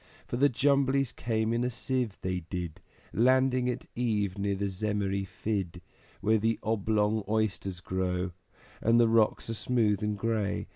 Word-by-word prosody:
For - - -4
the 140 +4 +4
Jumblies 135 0 +2
came 110 -1 -1
in 120 +1 +1
a 125 - +1
sieve, 125 -3 -2
they 90 -1 -1
did, 85 -1 -6 0.3
Landing 130 +1 +3
at 125 - -3
eve 105 -6 0
near 100 0 -1
the 100 +1 -2
Zemmery 100 0 -1
Fidd 95 -4 -3 0.4
Where 110 +2 +3
the 115 +2 +1
Oblong 110 0 +1
Oysters 100 -4 -1
grow, 90 0 -1 0.5
And 115 +1 +4
the 115 - +6
rocks 110 -1 +2
are - - -1
smooth 110 -3 +1
and 105 -1 -1
gray. 105 -2 -1
110 Hz, 155 wpm, -29 LUFS, 100-120 Hz, 0.5 s, the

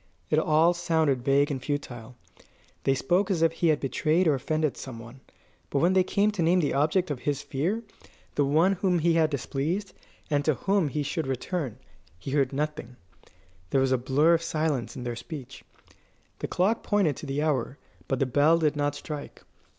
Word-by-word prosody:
It 155 - +4
all 160 +2 +4
sounded 160 -6 +1
vague 140 +2 +3
and 135 -2 -3
futile. 125 -5 -5 0.7
They 135 - +3
spoke 175 +10 +1
as 170 -4 +1
if 165 - +4
he 165 +1 0
had 155 -2 +3
betrayed 155 +6 +1
or 155 - +4
offended 155 +2 -1
some 130 -4 -8
one; 115 +3 -11 0.5
but - - -1
when 175 +6 +3
they 190 -1 +4
came 200 +3 +1
to 205 -4 -3
name 170 +3 +3
the 150 - 0
object 155 +4 +1
of 135 - -3
his 145 +1 -2
fear 160 +11 -2 0.5
the 145 - +2
one 155 +7 +3
whom 185 -1 +1
he 170 +1 +2
had 160 -1 +3
displeased, 155 +8 -3 0.3
and 145 -2 +1
to 155 -1 +2
whom 195 +2 +1
he 145 +1 -2
should 150 +1 -3
return 135 - -3 0.4
he 110 +10 -7
heard 140 -2 +2
nothing; 140 -3 -4 0.7
there 135 - +2
was 135 -1 +1
a 130 - +4
blur 140 +7 +3
of 165 - +2
silence 155 -6 -2
in 125 - -6
their 120 -1 -3
speech. 135 -1 -9 0.8
The - - -3
clock 200 +6 +1
pointed 195 - +1
to - - -8
the 140 +2 -1
hour, 135 -3 -1 0.3
but 135 - 0
the 135 - +1
bell 145 +5 +4
did 155 -2 +1
not 145 -1 0
strike. 150 -1 -8
150 Hz, 195 wpm, -27 LUFS, 135-170 Hz, 0.8 s, It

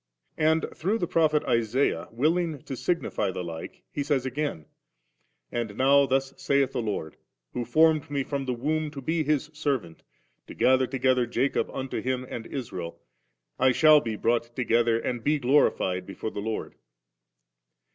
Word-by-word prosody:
And 160 +1 +3
through 200 +7 0
the 180 - -1
Prophet 155 -3 +2
Isaiah 115 -6 +1
willing 155 +4 0
to 135 - -5
signify 145 - -1
the 90 -1 -4
like, 80 -2 -8
He 145 - -3
says 140 -2 0
again: 130 - -3 0.4
' - - -47
And 115 -4 -3
now 140 +1 +5
thus 135 +1 0
saith 140 -1 +1
the 130 -3 -2
Lord, 100 -8 -4 0.4
who 125 - -2
formed 155 +4 +3
me 140 -1 -1
from 140 0 -3
the 130 - -1
womb 155 +5 -1
to 145 -2 -8
be 160 +3 0
His 150 0 0
servant, 135 - -2 0.5
to - - -10
gather 130 0 +3
to 135 - -4
gether 130 -1 +2
Jacob 135 +4 0
unto 135 0 -4
Him 130 0 -2
and 115 -2 -6
Israel, 90 -11 -6 0.6
I 130 0 +4
shall 155 0 +6
be 115 -4 -3
brought 120 +2 0
together 115 -2 +2
and 120 -1 -3
be 150 +3 +2
glorified 120 -9 +2
before 100 +2 -5
the 100 - -5
LordV 110 +1 -3
52. - - -35
130 Hz, 170 wpm, -27 LUFS, 115-150 Hz, 0.6 s, shall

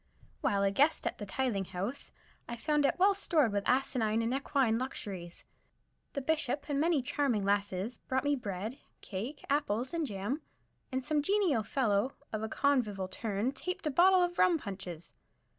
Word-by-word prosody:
While 200 0 +2
a 195 - +3
guest 285 +10 +3
at - - -2
the 205 - -5
Tithing 220 -4 -1
House, 195 +10 -4 0.4
I 235 - -3
found 295 +2 +2
it - - 0
well 390 +2 +5
stored 320 - +2
with 200 -1 -1
asinine 230 -4 +2
and 230 +2 0
equine 265 -4 +1
luxuries. 195 -9 -6 0.7
The 280 - -2
Bishop 295 -2 0
and 285 -2 0
many 315 -3 +2
charming 245 -6 0
lasses 200 +2 0
brought 260 0 -1
me 290 0 +2
bread, 215 +2 -5 0.2
cake, 225 +9 -6
apples 260 -3 0
and 330 -3 0
jam, 210 +8 -3 0.5
and 260 0 -2
some 300 -1 +2
genial 370 - +2
fellow 225 0 +1 0.2
of 215 - -1
a 220 - -3
convivial 220 -9 +1
turn 210 +4 -1
tapped 360 +6 -5
a 305 - +1
bottle 365 +5 +6
of 350 -1 -2
rum 350 -2 +5
punches. 190 - -7
255 Hz, 170 wpm, -32 LUFS, 205-290 Hz, 0.7 s, bottle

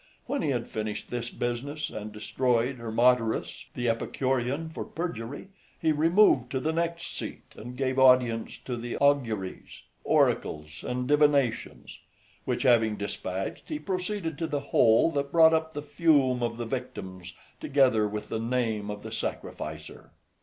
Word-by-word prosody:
When 280 -1 -2
he - - 0
had 120 -3 -1
finished 110 -1 -5
this 120 -1 -3
business, 140 +6 -3
and 105 0 -6
destroyed 120 +4 0
Hermodorus, 115 0 +1
the 120 -1 -1
Epicurean, 130 +5 -1
for 160 - -6
perjury, 145 - -5 0.3
he 160 -2 +2
removed 155 - +4
to 130 - +1
the 155 +5 -1
next 170 +1 -1
seat, - - -6
and 125 +3 -9
gave 130 -1 0
audience 125 -3 +4
to 125 - -3
the 120 +1 -4
auguries, 120 -9 0 0.2
oracles, 75 0 0
and 125 0 -2
divinations; 145 -4 +1 0.5
which - - -1
having 115 -4 +4
despatched, 95 -2 -4
he 305 - -2
proceeded 185 - -3
to 165 - -1
the 145 -2 -1
hole 115 +7 +5
that 140 -2 -2
brought 160 0 +6
up 160 0 0
the 145 - -4
fume 145 -4 +2
of 115 -1 -1
the 120 - -3
victims, 95 -8 -6 0.2
together 130 -6 +3
with 105 0 -5
the 110 - -2
name 115 -3 -1
of 105 0 -6
the - - -7
sacrificer. 75 0 -6
125 Hz, 150 wpm, -28 LUFS, 115-145 Hz, 0.5 s, brought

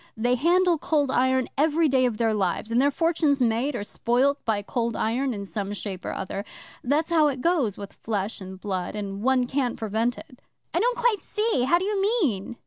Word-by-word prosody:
They 240 +3 +1
handle 345 +5 +3
Cold 290 -4 +1
Iron 260 0 +2
every 315 +2 +3
day 260 -2 +3
of 225 -3 -3
their 225 -1 +1
lives, 200 +2 -1
and 235 +2 +3
their 285 - +4
fortune's 315 -2 +1
made 245 +3 +1
or 205 - -3
spoilt 255 +7 0
by 210 -2 0
Cold 230 +2 -2
Iron 255 +5 0
in 200 -3 -5
some 200 0 -4
shape 195 -3 -6
or - - -2
other. 195 +1 -4 0.4
That's 300 +6 0
how 315 -3 +5
it 270 -3 -2
goes 280 - +1
with 200 -1 -8
Flesh 205 -1 -3
and 190 0 -9
Blood, 190 -1 -3
and 200 -1 -5
one 255 +1 +2
can't 255 -1 -1
prevent 225 +3 -1
it.' 250 - -13 0.3
'I - - +2
don't - - +1
quite 480 -4 +2
see. 425 - 0
How 340 +6 +4
do 365 - -2
you 405 -1 0
mean? 315 - 0
250 Hz, 210 wpm, -25 LUFS, 215-305 Hz, 0.4 s, how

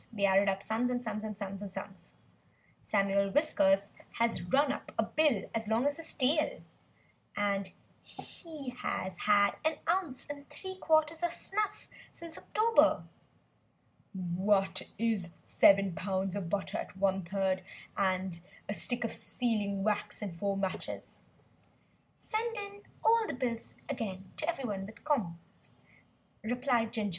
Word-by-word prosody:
They 205 -3 +1
added 195 +1 +5
up 195 0 -1
sums 230 +3 0
and 245 0 -1
sums, 215 -2 -3
and 215 -2 -5
sums. 195 -1 -7 0.7
"Samuel 200 -1 +2
Whiskers 200 -8 +3 0.2
has 230 -5 +1
run 270 +11 +3
up - - -5
a - - +4
bill 295 -10 +2
as 225 -1 -1
long 225 +4 +2
as 285 +1 +1
his 330 - +1
tail; 300 +4 +1 1.5
he 310 -6 -7
has 190 -6 -3
had 205 -1 +4
an 315 0 +2
ounce 335 -6 0
and 285 -1 -8
three 375 -1 -7
quarters 315 -1 +3
of 345 -1 +1
snuff 415 +4 -2 0.2
since 335 -1 -8
October." 455 +2 +3 1.1
"What 190 +1 +1 0.2
is 220 -6 0
seven 195 -2 +5
pounds 190 +1 -1
of 190 -4 -3
butter 195 +1 -1
at - - -7
1/3, 190 0 +1 0.3
and 185 -2 0 0.3
a 205 - -1
stick 245 +3 +1
of 230 - -1
sealing 205 -5 0
wax 210 0 0
and 190 -5 -4
four 200 +2 -1
matches?" 195 -1 -4 1.0
"Send 455 +1 -2
in 405 0 -6 0.2
all 450 -1 +5
the 285 - -3
bills 240 -2 -3
again 195 -8 -4
to 315 - -1
everybody 235 - -2
'with 220 +3 -12
comp'ts,'" 200 - -2 0.7
replied 245 -1 +1
Ginger. 210 -2 -1
215 Hz, 135 wpm, -32 LUFS, 195-285 Hz, 1.5 s, added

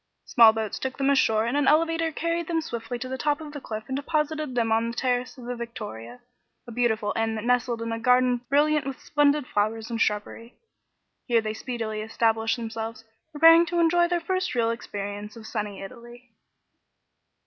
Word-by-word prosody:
Small 230 -3 +7
boats 220 -1 -4
took 265 0 -4
them 275 0 +2
ashore 225 -5 +3
and 235 +4 -1
an 290 -1 +2
elevator 330 +1 +2
carried 335 +1 -2
them 330 -1 0
swiftly 240 -5 -5
to 255 +2 -6
the 260 0 -5
top 295 +2 0
of 305 -2 -9
the 290 - -7
cliff 215 -3 -6
and 265 - -3
deposited 300 -1 -2
them 230 -2 +1
on 225 +1 +2
the 235 - -7
terrace 250 +1 -1
of 245 - -10
the 245 0 -4
Victoria, 230 - -8 0.5
a - - -8
beautiful 220 -3 0
inn 225 0 0
that 215 - -4
nestled 240 -1 0
in 230 - -4
a 225 - -3
garden 250 +1 +3
brilliant 295 +1 +2
with 270 - -5
splendid 290 -1 +2
flowers 220 +1 -1
and 230 0 -2
shrubbery. 215 +3 -2 0.7
Here 235 -2 +4
they 215 -1 -3
speedily 220 -2 -4
established 225 +1 0
themselves, 225 -1 -5 0.3
preparing 330 +2 +7
to 345 0 -1
enjoy 345 +1 +4
their 350 0 0
first 370 -1 -2
real 230 -1 +2
experience 205 -2 -6
of 225 -2 -11
"Sunny 210 -3 -4
Italy." 240 +3 -12
240 Hz, 190 wpm, -26 LUFS, 225-290 Hz, 0.7 s, Small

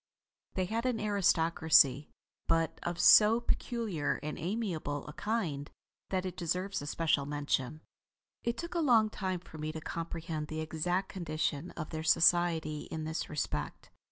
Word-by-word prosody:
They 185 - +1
had 230 +6 -1
an 245 -3 0
aristocracy; 160 -8 +3 0.4
but 165 -1 +1
of 175 0 -3
so 220 +2 +7
peculiar 230 -9 -1
and 150 0 -3
amiable 170 -7 -3
a 150 - -8
kind 170 -11 -2 0.4
that 190 -1 -1
it 185 -1 -4
deserves 185 +2 -2
a 145 - -7
special 155 -3 +1
mention. 145 0 -2 0.6
It 235 - -1
took 340 0 -5
a 345 - 0
long 230 -8 +4
time 185 -4 -3
for 160 -3 -12
me 155 +1 -3
to 160 - -6
comprehend 165 -1 -4
the 155 +1 -5
exact 175 +4 -1
condition 160 -2 -2
of 155 -2 -5
their 160 -1 -3
society 165 -2 +3
in 160 -1 -4
this 160 +1 -3
respect. 150 - -4
165 Hz, 155 wpm, -32 LUFS, 155-195 Hz, 0.6 s, so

